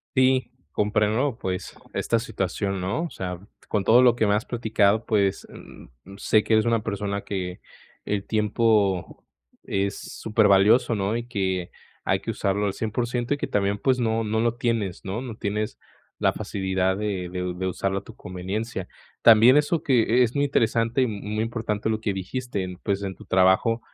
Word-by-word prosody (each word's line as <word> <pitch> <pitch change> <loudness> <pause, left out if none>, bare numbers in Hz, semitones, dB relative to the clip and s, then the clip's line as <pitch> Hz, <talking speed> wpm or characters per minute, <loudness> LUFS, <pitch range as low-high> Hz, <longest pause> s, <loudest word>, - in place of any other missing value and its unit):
Sí, 130 -1 +3 0.2
comprendo, 105 0 +1
¿no?, 130 -2 0
pues, 95 -6 -4 0.2
esta 115 - +1
situación, 100 -3 -3
¿no? 100 - -1
O 170 - -5
sea, 90 -2 -5 0.3
con 105 - 0
todo 120 +5 +6
lo 125 -2 +6
que 110 -2 +1
me 100 - +3
has 105 +3 0
platicado, 110 -2 +1
pues, 100 -3 +1
mm, - - -13 0.3
sé 105 +1 +2
que - - -2
eres 110 +1 +4
una 115 -2 +2
persona 100 -1 -3
que 90 -2 -4 0.4
el 100 -1 -2
tiempo 105 -3 +1 0.4
es 100 +1 -2 0.2
supervalioso, 110 +2 +4
¿no?, 100 +1 -1
y 120 0 -4
que 95 -6 -2 0.3
hay - - +1
que - - -4
usarlo 100 +1 0
al 100 - -2
100% 120 +3 -2
y 145 - +1
que - - -2
también, 100 0 0
pues, 130 +3 +1
no 115 -1 +1
no 110 0 -1
lo 120 0 +1
tienes, 115 -7 -1
¿no? 100 +5 -4
No 125 -4 -6
tienes 105 +1 -3 0.4
la - - +2
facilidad 95 -1 -1
de 100 -4 -3
de 90 0 -4
u 90 -1 -3
de 95 - -2
usarlo 95 +1 -1
a - - -21
tu - - -12
conveniencia. 95 +2 -5 0.3
También 115 +4 +7
eso 150 +2 +2
que 125 -2 +3
es 120 - -3
muy 140 - +3
interesante 115 -2 +1
y - - +3
muy 105 -1 -4
importante 110 -2 -2
lo 110 0 -1
que 105 - 0
dijiste, 95 -1 -4
pues, 100 -1 -1
en 95 -1 -4
tu - - -13
trabajo 95 +5 +3
105 Hz, 185 wpm, -25 LUFS, 95-115 Hz, 0.4 s, También